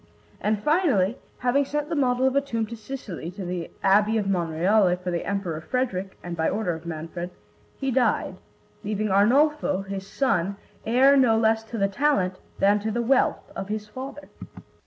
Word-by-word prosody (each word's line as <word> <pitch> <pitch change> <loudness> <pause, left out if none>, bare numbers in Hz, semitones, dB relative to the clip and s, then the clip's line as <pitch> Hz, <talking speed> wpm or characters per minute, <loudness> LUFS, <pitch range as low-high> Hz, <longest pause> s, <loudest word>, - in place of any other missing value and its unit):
And 210 0 -1
finally, 275 - +2 0.2
having 250 +3 +2
sent 295 +2 -3
the 330 - -1
model 255 -2 +2
of 265 0 +2
a 280 - +4
tomb 230 -5 -2
to 230 - -8
Sicily, 215 -8 -7
to 190 +1 -7
the 175 -2 -4
Abbey 210 +3 +4
of 210 - 0
Monreale, 180 +1 +2
for 180 0 -4
the 170 - -2
Emperor 185 -6 -2
Frederick 195 -5 -2
and 175 -1 -5
by 160 -1 +1
order 205 -5 -1
of 165 +1 -8
Manfred, 165 +2 -5 0.5
he 270 -1 -1
died, 255 -1 +1 0.5
leaving 210 0 -1
Arnolfo, 245 +1 +3
his 195 0 -6
son, 200 -6 0 0.3
heir 260 +4 +5
no 245 -5 +4
less 220 0 +3
to 230 - -6
the 195 -2 +2
talent 195 -5 +1 0.2
than 205 +1 +4
to 215 +2 -3
the 235 +2 -1
wealth 265 +3 +1
of 195 - -5
his 210 0 -3
father. 270 +5 -8
215 Hz, 180 wpm, -25 LUFS, 185-255 Hz, 0.5 s, heir